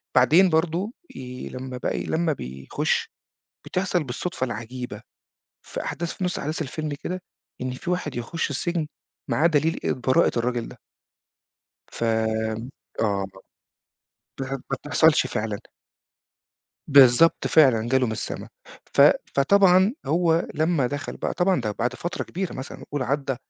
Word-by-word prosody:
بعدين 160 +9 +6
برضو 170 +6 0 0.2
ي 125 -1 -7
لمّا 130 0 -6
بقى - - -2
ي - - -4
لمّا 160 -1 +1
بيخش 65 - -2 0.6
بتحصل 180 -3 0
بالصدفة 135 +4 -3
العجيبة، 120 -1 -6 0.6
في - - -6
أحداث 170 0 -3
في 185 - -4
نُص 180 - -1
أحداث 155 +3 -2
الفيلم 155 +2 -4
كده 185 0 -3 0.4
إن 130 - -2
فيه 130 +7 -5
واحد 155 -7 -3
يخش 135 +7 -2
السجن 165 +3 -1 0.4
معاه 155 - +3
دليل 160 +1 +1
البراءة 130 -1 +2
الراجل 120 0 -1
ده. - - -12 1.1
فامم 110 +1 -1 0.3
آه. - - +2 0.3
ما 95 - -14 1.0
بتح 135 0 -4
ما 135 - -1 0.2
بتحصلش 150 -1 +3
فعلًا. 110 -4 -3 1.3
بالضبط 140 +3 +6
فعلًا 125 -8 +4
جاله 130 0 +3
من 110 - -2
السما. 110 - -5 0.4
ف - - +2 0.3
فطبعًا 190 - +5
هو 165 0 +2
لمّا 155 -3 +2
دخل 145 +2 -4
بقى - - -3
طبعًا 180 +1 +2
ده 105 - -2
بعد 120 +4 -2
فترة 175 +7 -4
كبيرة 190 0 -4
مثلًا 130 +1 -8
قل 145 -2 -1
عدَّى 135 0 -1
140 Hz, 140 wpm, -24 LUFS, 125-165 Hz, 1.3 s, بعدين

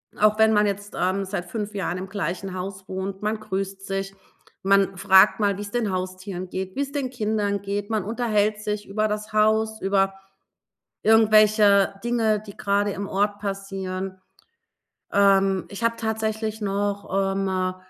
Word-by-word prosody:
Auch 215 +1 +3
wenn 220 0 +5
man 210 0 +4
jetzt, 205 0 -3
ähm, 190 +2 0
seit 190 -2 -4
5 210 +3 -5
Jahren 190 -3 -2
im 185 +1 -5
gleichen 190 0 -3
Haus 190 +1 -6
wohnt, 190 +1 -5
man 215 +1 -1
grüßt 195 -1 -4
sich, 195 0 -4 0.5
man 195 -1 +3
fragt 190 +2 +5
mal, 200 -2 +1
wie's 205 0 -6
den 230 -4 0
Haustieren 185 0 -4
geht, 190 0 -5
wie's 280 0 -2
den 280 -3 -2
Kindern 210 -4 -1
geht. 200 +1 -3
Man 215 -3 0
unterhält 215 -1 0
sich 210 0 -3
über 215 +2 0
das 215 0 -4
Haus, 220 +1 +2
über 195 0 +2 0.9
irgendwelche 215 -2 +5
Dinge, 225 -3 +1
die 200 - -10
grade 200 0 +1
im 195 +1 -5
Ort 205 +1 0
passieren. 195 -1 -4 0.9
Ähm, 195 -1 +3
ich 200 +3 -6
habe 230 0 +2
tatsächlich 220 0 -2
noch, 200 -1 -1
ähm, 185 -1 -1
200 Hz, 155 wpm, -24 LUFS, 195-215 Hz, 0.9 s, wenn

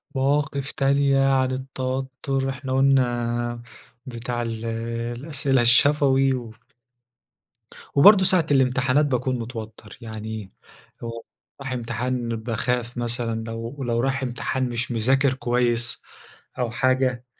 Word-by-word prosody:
مواقف 140 +1 0
تانية 135 0 +2
عن 130 -1 +2
التوتر. 130 +1 -3
إحنا 130 0 -4
قُلنا 120 -3 +1 0.4
بتاع 120 -1 -4
ال 115 -1 -4 0.5
الأسئلة 135 -1 +1
الشفوي 135 +2 +4
و 120 -3 -5 1.4
وبرضه 190 +7 +7
ساعة 180 -3 +4
الامتحانات 135 +1 +3
باكون 130 -1 -1
متوتر. 110 -2 -8
يعني 110 -3 -7 0.5
لو 115 -1 -7 0.4
رايح 135 -1 -4
امتحان 120 0 -2
باخاف 120 +2 -2
مثلًا، 115 -1 -2
لو 115 +4 -6
لو 120 -1 0
رايح 135 +1 0
امتحان 125 +1 -2
مش 120 +1 -2
مذاكر 130 +4 +2
كويس 120 -2 0 0.6
أو 120 -2 -1
حاجة. 130 0 +1
125 Hz, 105 wpm, -23 LUFS, 120-135 Hz, 1.4 s, وبرضه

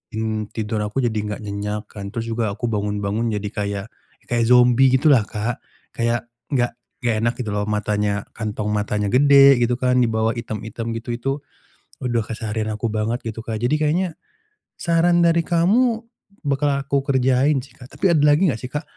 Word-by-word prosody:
mmm, 110 -1 -2
tidur 110 0 -2
aku 105 +6 -2
jadi 115 -2 0
nggak 105 -1 -3
nyenyak, 105 +1 -4
kan. 100 -2 -7
Terus 115 0 -4
juga, 115 -2 -1
aku 110 +4 -3
bangun-bangun 105 +2 -1
jadi 105 -1 -2
kayak 100 -1 -3 0.4
kayak 120 -1 +1
zombi 125 +1 +5
gitulah, 130 -4 +5
Kak. 110 +2 -3 0.4
Kayak, 115 0 -1 0.2
nggak 120 -3 +1 0.3
nggak 120 -2 +1
enak, 120 +1 +2
gitu 115 -4 -3
loh. 105 - 0
Matanya, 105 -1 0 0.2
kantong 105 -1 -3
matanya 105 0 -1
gede, 140 0 +7
gitu 120 +1 +2
kan, 125 0 +2
di 120 - +2
bawah 110 0 +1
item-item 115 0 -5
gitu. 120 +1 -9
Itu, 120 +3 -2 0.7
waduh 120 -3 0
keseharian 110 -1 -3
aku 110 +2 -2
banget, 110 +3 -1
gitu, 115 0 -5
Kak. 110 -2 -3
Jadi 125 +5 +2
kayaknya, 170 +5 +1 0.7
saran 170 +1 +3
dari 170 0 +4
kamu, 220 +8 +2 0.4
bakal 140 +1 +1
aku 140 0 0
kerjain, 130 +1 +2
sih, 135 - -17
Kak. 125 0 -13
Tapi 190 - +2
ada 155 - +3
lagi 155 +5 +4
nggak 115 - -5
sih, 125 - -5
Kak, 150 +1 -3
115 Hz, 175 wpm, -21 LUFS, 105-135 Hz, 0.7 s, gede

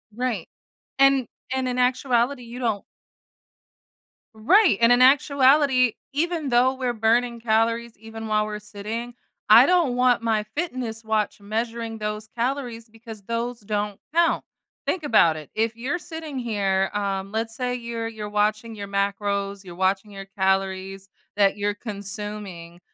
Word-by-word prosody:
Right, 240 -8 -2 0.5
and 275 -3 +5 0.3
and 260 -1 -1
in 250 0 -2
actuality, 250 0 +1
you 240 +2 -9
don't 220 -5 -1 1.5
Right. 330 - +4
And 230 +1 +6
in 245 +1 +5
actuality, 265 -2 +5 0.2
even 320 0 -1
though 250 +2 +4
we're 255 -2 -2
burning 235 +2 +1
calories 230 +1 0
even 225 +1 -8
while 215 0 +1
we're 210 0 -4
sitting, 215 +3 -6 0.4
I 230 +5 +9
don't 340 -9 +3
want 250 -2 +3
my 220 -2 +1
fitness 250 -9 -3
watch 215 -1 -1
measuring 225 +2 -4
those 210 0 -4
calories 240 -2 -3
because 225 -2 -11
those 230 +2 -3
don't 210 -1 -3
count. 335 0 +3 0.4
Think 355 -4 -1
about 210 - +4
it. 150 - -10
If 225 +1 0
you're 280 +9 -2
sitting 320 -5 -6
here, 195 -5 0
um, 195 -1 -2
let's 225 +1 -3
say 250 -1 -2
you're 235 -1 -4
you're 215 -2 -6
watching 215 +2 0
your 200 -1 -6
macros, 200 0 -1
you're 175 -2 -10
watching 195 +3 0
your 195 -1 -8
calories 190 0 -1 0.3
that 200 -1 +4
you're 205 0 -1
consuming. 200 -5 -7
225 Hz, 145 wpm, -24 LUFS, 205-250 Hz, 1.5 s, I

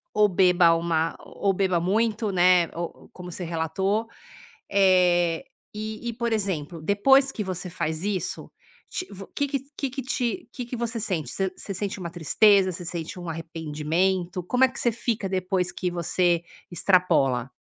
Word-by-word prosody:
ou 210 0 +5
beba 180 -3 +5
uma 165 -1 0
ou 200 -1 -1
beba 185 -2 +1
muito, 215 +4 0
né, 180 -1 +5
ou 170 0 -3
ou - - -18
como 180 -1 -9
você 180 - -6
relatou. 175 +6 -1 0.6
Eh, 180 -1 +3 0.3
e 215 +2 -5
e, - - -4
por 235 0 -2
exemplo, 175 -6 -2
depois 265 - +4
que 215 - -3
você 185 -1 -4
faz 160 -2 -3
isso, 195 -4 -3 0.4
te 365 - -4
o 195 0 -9
que 285 - -2
que 275 0 -1 0.2
que 275 - -1
que 270 - -4
te 255 +5 -2
que 250 - -5
que 245 - -6
você 235 0 -2
sente? 175 - -2
Você 190 -1 -1
você 200 - -6
sente 195 +1 -3
uma 175 -2 -4
tristeza? 190 +3 +4
Você 175 0 -7
sente 170 0 -5
um 175 -1 -6
arrependimento? 165 +3 -1
Como 250 +9 +1
é 260 - +6
que 255 - -8
você 240 - +2
fica 220 -3 -2
depois 185 -1 0
que 180 -1 -3
você 175 0 +1 0.3
extrapola? 165 -9 +2
185 Hz, 175 wpm, -25 LUFS, 170-210 Hz, 0.6 s, é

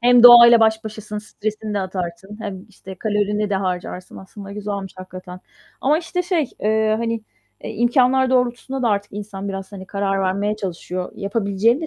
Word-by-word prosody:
Hem 245 0 +6
doğayla 240 -1 +10
baş 220 0 +3
başasın, 215 -1 -6
stresini 215 0 -5
de - - +1
atarsın, 185 +1 -5
hem, 195 -3 -6
işte, 190 - -11
kalorini 210 -1 0
de - - +1
harcarsın 180 -1 -4
aslında 195 +1 -10
güzelmiş 200 -2 -5
hakikaten. 185 0 -10 0.4
Ama, 295 +4 +3
işte, 360 +1 -3
şey, 340 -6 0
ııı, 220 0 +2
hani, 230 -1 -2 0.4
eee, - - -5
imkânlar 255 +2 +3
doğrultusunda 255 +1 0
da 240 - +2
artık 205 -1 -1
insan 200 -1 -6
biraz, 195 +1 -6
hani, 190 -1 -9
karar 195 0 -1
vermeye 200 +3 0
çalışıyor. 180 -2 -5
Yapabileceğin 205 +4 +1
de 325 - -3
210 Hz, 165 wpm, -21 LUFS, 195-235 Hz, 0.4 s, doğayla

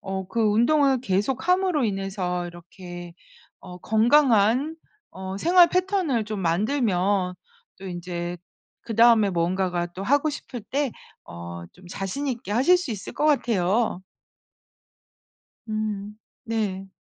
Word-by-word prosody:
어 190 -1 -4
그 230 - -2
운동을 250 +5 +3
계속 250 - -1
함으로 365 -7 +2
인해서 190 -3 -2
이렇게 175 0 -10 0.5
어 180 -1 -10
건강한 240 - +3 0.3
어 190 0 -6
생활 350 - +6
패턴을 365 - 0
좀 215 -1 -4
만들면 190 -1 +1 0.4
또 190 - -9
인제 175 -1 -5 0.5
그다음에 230 -2 +4
뭔가가 175 0 0
또 180 +2 -9
하고 290 +5 +2
싶을 255 -4 -7
때 275 +4 -2 0.3
어 85 0 -8
좀 180 0 -17
자신 195 +10 -4
있게 240 -4 -4
하실 270 +11 +5
수 350 -7 -5
있을 195 - -7
것 300 - 0
같아요. 230 -7 +1 1.7
음. 210 -1 -4 0.3
네. 205 -4 -2
210 Hz, 220 characters per minute, -24 LUFS, 185-260 Hz, 1.7 s, 생활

